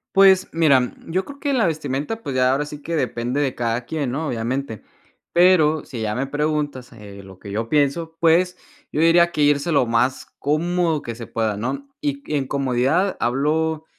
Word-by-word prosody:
Pues 195 -1 +6
mira, 140 -7 +3
yo 185 +3 -1
creo 280 0 -11
que 285 -1 -1
la 245 -4 +2
vestimenta, 155 +6 -2
pues, 135 -9 -5
ya 130 0 +3
ahora 145 +2 0
sí 150 -1 -9
que 170 - -3
depende 125 0 -1
de 135 -3 -1
cada 120 0 -1
quien, 145 -6 -2
¿no?, 155 +4 -3
obviamente, 120 -1 -3 0.5
pero, 170 -4 +4
si 120 -5 -7
ya 105 -1 -1
me 135 +4 -2
preguntas, 145 -3 -2
eh, 100 -3 -11
lo 95 -1 -14
que 100 - -10
yo 110 +3 -2
pienso, 150 +4 0
pues, 175 +2 +3 0.4
yo 150 - 0
diría 170 +1 +5
que 150 - -2
irse 145 +3 +2
lo 135 -5 +3
más 120 +3 0
cómodo 165 +1 0
que 115 - -6
se 115 0 -8
pueda, 110 -2 -2
¿no? 275 - -4
Y 285 -2 -2
y - - +1
en 135 - -1
comodidad 140 +8 0
hablo 155 +6 0
145 Hz, 195 wpm, -21 LUFS, 125-165 Hz, 0.5 s, Pues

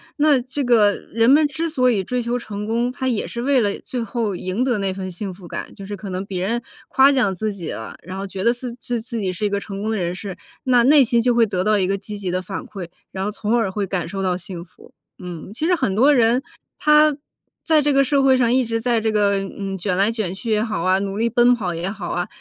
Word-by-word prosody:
那 295 -3 +4
这 265 +3 -4
个 225 -5 +4 0.2
人 230 +1 +3
们 300 +3 +6
之 320 +4 -3
所 255 -6 +2
以 200 -5 0
追 250 +6 -2
求 240 +1 -1
成 210 -3 -6
功， 235 +3 0
他 260 +1 -3
也 230 -4 -1
是 235 - -5
为 270 +1 +3
了 205 -3 0
最 250 - -5
后 225 -2 -2
赢 185 +6 -2
得 250 -4 +1
那 195 -2 -1
份 185 -1 -5
幸 190 +2 -5
福 180 0 -14
感， - - -6
就 195 - -9
是 205 +1 -6
可 200 0 -7
能 185 +1 -4
别 185 -2 -3
人 235 +2 -1 0.3
夸 270 +1 +5
奖 250 -8 +2
自 215 +3 -2
己 175 -5 -6
了， 110 - -7
然 185 +2 -7
后 195 - -4
觉 190 -1 -5
得 235 - +5
自 245 0 -6
自 235 -1 -4
己 190 -3 -1
是 180 - -6
一 - - +1
个 200 0 -1
成 200 -1 -7
功 220 +1 -1
人 180 -4 -2
士， 190 0 -7 0.3
那 250 -3 +4
内 285 +2 +7
心 235 -1 +2
就 245 +1 +2
会 235 -1 +5
得 190 -4 -1
到 215 0 +3
一 190 - +2
个 195 +1 0
积 210 +1 -7
极 190 -3 -3
的 185 +1 -1
反 190 +2 -6
馈， 190 -4 -7 0.2
然 190 0 -3
后 210 - -1
从 215 +2 -1
而 225 -4 +1
会 200 +1 -2
感 180 -3 -2
受 195 +3 -4
到 180 -1 0
幸 180 -2 -6
福。 180 - -19 0.3
嗯， 180 -1 -8
其 305 +8 -1
实 360 - +4
很 255 - 0
多 270 +7 +5
人， 240 -1 +3 0.4
他 300 0 +5 0.5
在 315 -2 +4
这 290 0 +2
个 275 0 +5
社 275 0 +2
会 265 -1 +5
上 240 -2 +2
一 255 0 +3
直 230 0 -2
在 235 -1 +2
这 220 0 0
个， 205 -2 +2
嗯， 195 0 -5
卷 185 0 -1
来 200 +4 +3
卷 215 -6 -2
去 225 +5 -6
也 215 -1 +3
好 215 -7 -2
啊， 185 +2 +2
努 195 0 -3
力 230 +2 +1
奔 240 +1 +5
跑 195 -7 -2
也 170 +3 -3
好 195 -3 -6
啊， 175 0 -1
215 Hz, 290 characters per minute, -21 LUFS, 195-245 Hz, 0.5 s, 内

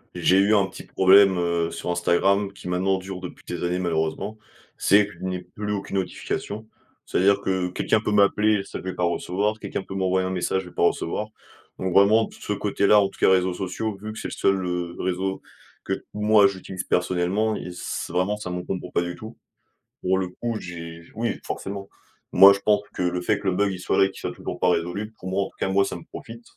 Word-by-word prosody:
J'ai 95 - +3
eu 105 +2 +4
un 100 - +4
petit 95 - -10
problème, 95 0 +6
heu, 85 -1 0
sur 90 - -4
Instagram 95 +3 +2
qui 100 - -11
maintenant 95 +2 +1
dure 95 0 -7
depuis 90 - -9
des 90 -1 -4
années 90 +1 0
malheureusement, 85 +4 -2 0.4
c'est 100 +1 +5
que 105 - -11
je - - -18
n'ai 90 -1 -2
plus 105 0 -6
aucune 100 -1 -3
notification. 100 +3 -4 0.4
C'est - - -1
à - - +3
dire 100 +1 +4
que 95 -2 0
quelqu'un 105 +4 +1
peut 105 - -1
m'appeler, 105 0 +3
ça, - - -7
je - - -10
vais 95 - -4
pas 90 - -2
recevoir, 100 +5 0
quelqu'un 100 -2 -4
peut 95 - -9
m'envoyer 95 -1 +1
un 95 - -2
message, 95 +1 -1
je 90 - -11
vais - - -20
pas - - -1
recevoir. 105 +6 -2 0.5
Donc 95 -1 -2
vraiment 105 +3 +6
de - - -14
ce 105 - -4
côté-là, 105 0 +3
en 100 - +2
tout - - -18
cas - - +5
réseaux 95 -1 +3
sociaux, 100 +4 -3
vu 110 +1 -6
que - - -11
c'est - - -4
le - - -10
seul, 100 - +2
heu, 90 -1 -3
réseau 95 +1 -2 0.4
que - - -2 0.2
moi 105 -1 +5
j'utilise 95 -1 -5
personnellement, 90 +5 +1
il 90 - -6
c 90 - -9 0.2
c'est - - -10
vraiment, 90 +3 +1
ça 105 -3 -6
m'encombre 90 +1 -4
pas 85 - +1
du 90 0 -5
tout. 110 +4 -10 0.6
Pour 95 +1 +2
le 95 - -1
coup, 115 +5 -4
j'ai 85 -1 -8
oui 115 +2 -2
forcément. 100 0 -5 0.5
Moi, 95 +2 +10
je 100 - +1
pense 105 -1 +3
que - - -1
le 90 0 0
fait 100 +3 +1
que 100 - -5
le 95 - +2
bug 100 0 +2
il 95 - -6
soit - - 0
là 95 - +7
et - - -1
qu'il - - -12
soit - - -3
toujours - - -6
pas 90 - +3
résolu, 90 +5 -1
pour 95 - -6
moi 100 +1 +1
en - - -6
tout - - -29
cas, - - 0
moi 100 +1 +3
ça - - -4
me - - -9
profite. 115 +1 -10
95 Hz, 240 wpm, -24 LUFS, 90-100 Hz, 0.6 s, Moi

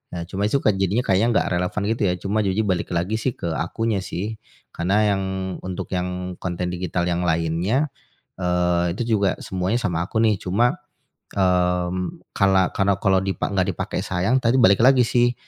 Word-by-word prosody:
Nah, 85 - -3
cuma 100 +2 -1
itu 135 +6 +1
kan 105 - +3
jadinya 100 +6 +1
kayaknya 100 +5 +2
enggak - - +2
relevan, 90 +3 -1
gitu 115 - -2
ya. 90 - +2
Cuma 100 +2 0
ujung-ujungnya 100 0 +1
balik 85 - -2
lagi 90 +6 0
sih 120 +2 -1
ke 85 - -5
akunya, 105 +7 -1
sih. 105 +5 -5 0.4
Karena 90 +4 0 0.2
yang 95 - -2 0.4
untuk 95 -1 -5
yang 90 0 -4
konten 90 0 -3
digital 90 0 -2
yang 90 0 0
lainnya, 85 - 0 0.5
eee, 90 -1 +1
itu 120 -2 0
juga 100 -2 +1
semuanya 95 +5 -1
sama 85 -4 0
aku 110 - -2
nih, 110 -2 +4
cuma, 120 - +1 0.6
mmm, 90 -1 0
kala 95 -1 +3
karena 100 0 +2
kalau 95 -1 +4
dipa 95 0 -2
enggak 95 -2 0
dipakai - - -3
sayang 95 +8 +1
tadi 120 +2 +3
balik 100 0 +5
lagi 130 -1 +6
sih, 120 0 +2
95 Hz, 180 wpm, -22 LUFS, 90-110 Hz, 0.6 s, lagi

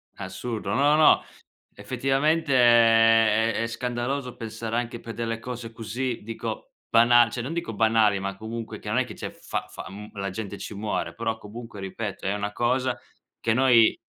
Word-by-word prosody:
Assurdo. 100 +4 -4
No, 145 +3 +4
no, 155 - +6 0.5
effettivamente 140 +4 0
è 115 -2 +5
è - - -1
è - - -1
scandaloso 125 +2 -3
pensare 115 0 -5
anche 120 -1 -2
per 115 - -8
delle 115 -1 -3
cose 120 -1 -7
così, 115 +2 -4
dico 115 +1 -6 0.2
bana 120 0 +6
cioè, 120 - -4
non 135 +7 -4
dico 170 -9 -3
banali, 110 -2 +3
ma 100 0 -4
comunque 110 +1 -6
che 105 - -7
non 110 - 0
è 130 - +2
che 115 - -9
c'è - - -6
fa - - -5
fa - - -9
mhmm, 105 +2 -9
la 100 -2 -3
gente 100 +1 -6
ci - - -7
muore, 105 +1 -3
però 115 -1 -2
comunque, 110 0 -10
ripeto, 100 +1 -5
è 95 - +1
una 105 0 -3
cosa 125 +2 0 0.4
che 115 - +1
noi 120 -2 +5
115 Hz, 180 wpm, -25 LUFS, 110-120 Hz, 0.5 s, no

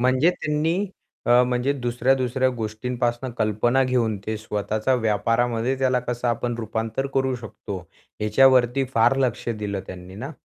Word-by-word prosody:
म्हणजे 130 +6 +4
त्यांनी 165 +3 -1 0.4
अ, 120 +1 +6
म्हणजे 125 +2 +1
दुसऱ्या-दुसऱ्या 130 0 +1
गोष्टींपासून 120 +3 -2
कल्पना 115 +5 +2
घेऊन 120 -4 +1
ते 110 0 -1
स्वतःचा 110 +3 -1
व्यापारामध्ये 115 +2 +1
त्याला 130 -1 +2
कसं 120 0 -2
आपण 120 +1 -1
रुपांतर 115 +3 -2
करू 130 -1 +1
शकतो, 110 -4 -7 0.4
ह्याच्यावरती 130 +3 +4
फार 115 +4 +4
लक्ष 125 -3 -1
दिलं 105 -3 -3
त्यांनी 90 0 -9
ना? 125 +8 -6
120 Hz, 130 wpm, -24 LUFS, 110-130 Hz, 0.4 s, अ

